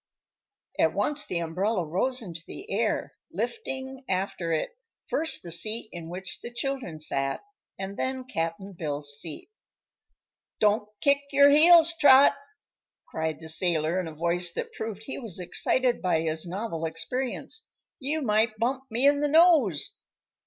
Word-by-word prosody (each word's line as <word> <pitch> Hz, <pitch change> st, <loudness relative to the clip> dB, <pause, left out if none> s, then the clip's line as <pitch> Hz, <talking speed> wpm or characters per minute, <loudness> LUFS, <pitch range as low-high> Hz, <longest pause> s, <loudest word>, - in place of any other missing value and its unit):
At -, -, +3 dB
once 295 Hz, 0 st, 0 dB
the 175 Hz, -, -2 dB
umbrella 180 Hz, +4 st, -1 dB
rose 235 Hz, +11 st, -1 dB
into 170 Hz, -4 st, -8 dB
the 405 Hz, +6 st, -9 dB
air, -, -, -1 dB, 0.2 s
lifting 265 Hz, -, -4 dB
after 185 Hz, -2 st, -2 dB
it, 160 Hz, -, -1 dB, 0.4 s
first 320 Hz, 0 st, 0 dB
the 170 Hz, -, -7 dB
seat 215 Hz, +7 st, 0 dB
in 165 Hz, -1 st, -8 dB
which 185 Hz, +2 st, -7 dB
the 240 Hz, -, -7 dB
children 245 Hz, -, -4 dB
sat, 135 Hz, -3 st, -2 dB, 0.4 s
and 195 Hz, +1 st, -6 dB
then 260 Hz, 0 st, -2 dB
Cap'n 190 Hz, -3 st, -4 dB
Bill's 145 Hz, -3 st, -2 dB
seat. 160 Hz, -, -8 dB, 1.1 s
"Don't 210 Hz, 0 st, +2 dB
kick 280 Hz, 0 st, +4 dB
your 280 Hz, 0 st, +6 dB
heels, 330 Hz, +2 st, +8 dB
Trot!" 275 Hz, -1 st, +7 dB, 0.8 s
cried 160 Hz, -1 st, -3 dB
the 160 Hz, -, -9 dB
sailor 160 Hz, +1 st, +1 dB
in 180 Hz, -, -3 dB
a 160 Hz, -, -8 dB
voice 170 Hz, +2 st, 0 dB
that -, -, -5 dB
proved 220 Hz, -1 st, -6 dB
he 265 Hz, -, -6 dB
was 220 Hz, -9 st, -4 dB
excited 245 Hz, +7 st, 0 dB
by 180 Hz, -4 st, +1 dB
his 160 Hz, +1 st, -2 dB
novel 175 Hz, -3 st, -4 dB
experience; 250 Hz, -, -4 dB, 0.3 s
"you 295 Hz, +3 st, -2 dB
might 215 Hz, -1 st, +2 dB
bump 255 Hz, +4 st, -1 dB
me 240 Hz, +4 st, +1 dB
in 285 Hz, 0 st, +4 dB
the 295 Hz, -, +1 dB
nose." 300 Hz, -, +4 dB
210 Hz, 150 wpm, -27 LUFS, 165-265 Hz, 1.1 s, heels